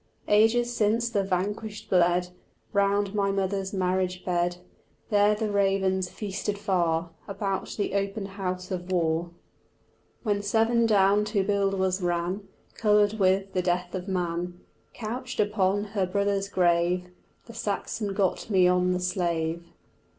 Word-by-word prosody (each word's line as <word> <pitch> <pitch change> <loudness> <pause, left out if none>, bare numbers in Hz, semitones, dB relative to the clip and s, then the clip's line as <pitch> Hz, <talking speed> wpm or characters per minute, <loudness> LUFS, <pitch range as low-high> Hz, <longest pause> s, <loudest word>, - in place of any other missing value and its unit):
Ages 235 +3 +3
since 230 +2 +1
the 200 -3 +1
vanquished 205 +3 -3
bled 180 0 +3 0.4
Round 200 0 +2
my 200 -2 +1
mother's 195 0 -1
marriage 185 -1 -1
bed; 175 -1 0 0.5
There 205 0 +4
the 215 0 -2
ravens 190 -2 +1
feasted 200 +1 -4
far 170 -5 0 0.2
About 195 -1 -3
the 205 - -1
open 200 +1 -1
house 185 -2 -4
of 180 0 -4
war: 170 -1 +1 0.9
When 205 -3 0
Severn 225 +3 +2
down 205 -1 +4
to 210 -2 0
Buildwas 195 -2 0
ran 175 +3 -1 0.3
Coloured 210 0 +2
with 195 0 +2
the 185 - +1
death 180 0 -1
of 185 0 -4
man, 175 -1 -2 0.4
Couched 245 +3 -5
upon 205 -1 +2
her 200 -3 -1
brother's 200 +1 0
grave 180 0 +1 0.3
The 230 - -11
Saxon 205 -1 -3
got 195 +2 0
me 185 -3 +5
on 180 0 +3
the 180 - -1
slave. 170 -2 -1
195 Hz, 135 wpm, -27 LUFS, 180-205 Hz, 0.9 s, me